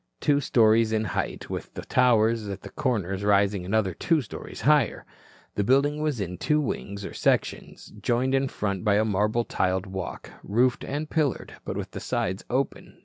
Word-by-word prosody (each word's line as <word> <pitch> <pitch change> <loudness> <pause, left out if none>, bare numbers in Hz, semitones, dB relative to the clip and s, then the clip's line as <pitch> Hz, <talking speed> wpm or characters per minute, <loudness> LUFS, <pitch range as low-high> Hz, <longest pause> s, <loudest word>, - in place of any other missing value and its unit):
Two 145 -1 +2
stories 115 -3 +4
in 110 0 +1
height, 95 - -3
with - - -6
towers 115 -3 +3
at 100 -1 -5
the - - -9
corners 100 - -1
rising 100 -1 +3
another 95 0 0
two 165 - +1
stories 125 - -8
higher, - - +3 0.5
the 100 - 0
building 140 +6 +2
was 150 -6 -1
in 90 -2 -4
two 150 0 +2
wings 100 -8 -4
or - - -7
sections, - - -1
joined 125 +4 +1
in 135 0 +2
front 100 -5 -3
by 105 -2 +3
a 110 +1 +3
marble 105 +3 +1
tiled 95 +1 0
walk, 95 -1 -6
roofed 125 +4 +1
and 150 +2 -4
pillared, 150 -5 0
but - - -4
with - - -5
the - - -6
sides 95 +4 -2
open. 130 +2 -2
110 Hz, 175 wpm, -26 LUFS, 100-130 Hz, 0.5 s, stories